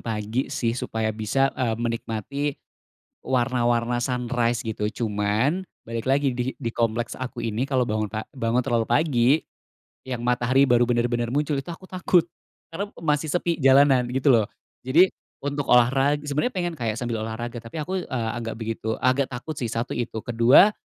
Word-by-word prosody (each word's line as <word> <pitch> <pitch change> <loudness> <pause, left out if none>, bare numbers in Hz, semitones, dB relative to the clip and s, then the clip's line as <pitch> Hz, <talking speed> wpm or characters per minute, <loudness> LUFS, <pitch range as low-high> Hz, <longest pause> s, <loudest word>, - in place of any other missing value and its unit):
pagi 110 +3 -2
sih 120 -4 -1
supaya 110 -2 -2
bisa, 115 +6 +1
eee, 120 -4 -1
menikmati 115 +3 -3 0.8
warna-warna 120 -2 +1
sunrise 120 -2 0
gitu. 110 -3 -2
Cuman 110 - 0 0.2
balik 115 0 -3
lagi 135 -2 +2
di 125 +1 -1
di 115 -3 -3
kompleks 115 0 -1
aku 130 -1 -6
ini 110 +1 -2
kalo 130 -2 +1
bangun 110 -1 -1
pa 110 0 -4
bangun 115 -1 +1
terlalu 120 -1 +1
pagi, 125 -2 +3 0.8
yang 120 -2 -3
matahari 125 +2 +3
baru 120 -2 +3
benar-benar 120 0 +1
muncul 145 +4 0
itu 135 - -13
aku 170 +2 -8
takut. 180 -2 +2 0.5
Karena 200 +5 -3
masih 150 -1 0
sepi 170 0 0
jalanan 135 -2 +5
gitu 130 +2 +3
loh. 110 -4 +4 0.4
Jadi 165 +9 +4 0.3
untuk 145 0 -2
olahra 135 +4 +4
sebenarnya 150 - -1
pengen 175 -2 -1
kayak 115 -7 -2
sambil 120 -2 -3
olahraga 120 +2 -5
tapi 115 +6 -10
aku, 180 +4 -2
eee, 115 -4 -2
agak 115 -2 -4
begitu 110 0 -3
agak 130 +1 +2
takut 125 +6 -6
sih 125 -5 -3
satu 115 +2 -3
itu, 115 -2 -4
kedua 120 - +6
120 Hz, 160 wpm, -24 LUFS, 115-140 Hz, 0.8 s, kedua